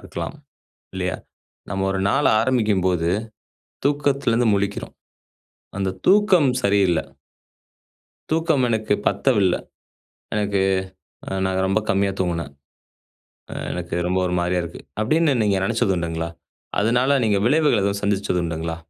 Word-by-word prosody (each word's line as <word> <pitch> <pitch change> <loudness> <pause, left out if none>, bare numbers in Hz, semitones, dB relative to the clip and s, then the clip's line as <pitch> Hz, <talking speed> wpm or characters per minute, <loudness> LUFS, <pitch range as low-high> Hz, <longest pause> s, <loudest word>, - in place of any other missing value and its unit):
இருக்கலாம் - - -6 0.6
இல்லையா? 90 -1 -2 0.5
நம்ம 95 -1 -1
1 95 0 -1
நாள் - - +3
ஆரம்பிக்கும்போது 100 -8 +1 0.8
தூக்கத்திலிருந்து 140 -5 +2
முழிக்கிறோம். 100 0 -3 0.8
அந்த 95 -1 -1
தூக்கம் 190 -7 +5
சரியில்ல 100 -5 +3 1.3
தூக்கம் 160 -4 +2
எனக்கு 110 -2 +1
பத்தவில்ல. 105 -9 +2 0.8
எனக்கு 100 -2 0 0.7
அ - - -5 0.2
நான் 95 0 0
ரொம்ப 95 +3 +1
கம்மியாக 100 0 +1
தூங்குனேன். 85 -6 -2 1.0
அ - - -4 0.2
எனக்கு 90 -1 -4
ரொம்ப 90 +1 +1
1 90 - -1
மாதிரியா 90 0 0
இருக்கு. 85 0 -8 0.2
அப்டின்னு 155 +5 +2
நீங்க 100 -2 +2
நினைச்சது 95 0 +1
உண்டுங்களா? 85 -1 -3 0.5
அதனால 125 +6 +3
நீங்க 105 -2 +2
விளைவுகள் 145 -7 +3
எதுவும் 100 0 -1
சந்திச்சது 100 -3 0
உண்டுங்களா? 80 0 -3
100 Hz, 115 wpm, -22 LUFS, 90-125 Hz, 1.3 s, தூக்கம்